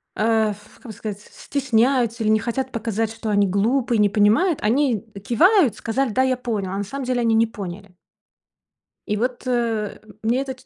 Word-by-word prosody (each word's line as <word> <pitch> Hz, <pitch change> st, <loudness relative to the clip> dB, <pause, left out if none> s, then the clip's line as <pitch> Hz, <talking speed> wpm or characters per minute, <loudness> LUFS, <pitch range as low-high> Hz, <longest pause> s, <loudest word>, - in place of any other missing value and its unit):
а, 220 Hz, 0 st, +2 dB
ф 210 Hz, +1 st, -18 dB
как -, -, -24 dB
бы -, -, -6 dB
сказать, 205 Hz, -1 st, -6 dB
стесняются, 245 Hz, -2 st, 0 dB
или 215 Hz, -, +1 dB
не 215 Hz, 0 st, +4 dB
хотят 260 Hz, +3 st, -3 dB
показать, 225 Hz, -1 st, -2 dB
что 225 Hz, 0 st, -5 dB
они 205 Hz, -1 st, +3 dB
глупые, 230 Hz, +4 st, +1 dB
не 205 Hz, -, +4 dB
понимают. 220 Hz, -, +3 dB
Они 240 Hz, 0 st, +1 dB, 0.2 s
кивают, 320 Hz, -, +4 dB
сказали: 260 Hz, +3 st, -1 dB
"Да, 260 Hz, +5 st, +2 dB
я 260 Hz, -1 st, +1 dB
понял", 215 Hz, -7 st, -3 dB
а 195 Hz, -, -3 dB
на 200 Hz, -, -1 dB
самом 270 Hz, +6 st, -6 dB
деле 245 Hz, -1 st, 0 dB
они 225 Hz, -1 st, +2 dB
не 230 Hz, +1 st, +4 dB
поняли. 200 Hz, -2 st, -8 dB, 1.2 s
И, 210 Hz, -, 0 dB
вот, 245 Hz, +4 st, -3 dB
э, 230 Hz, -4 st, -1 dB, 0.2 s
мне 235 Hz, +4 st, +1 dB
это 270 Hz, -1 st, -4 dB
ч 255 Hz, -, -20 dB
230 Hz, 190 wpm, -22 LUFS, 210-255 Hz, 1.2 s, не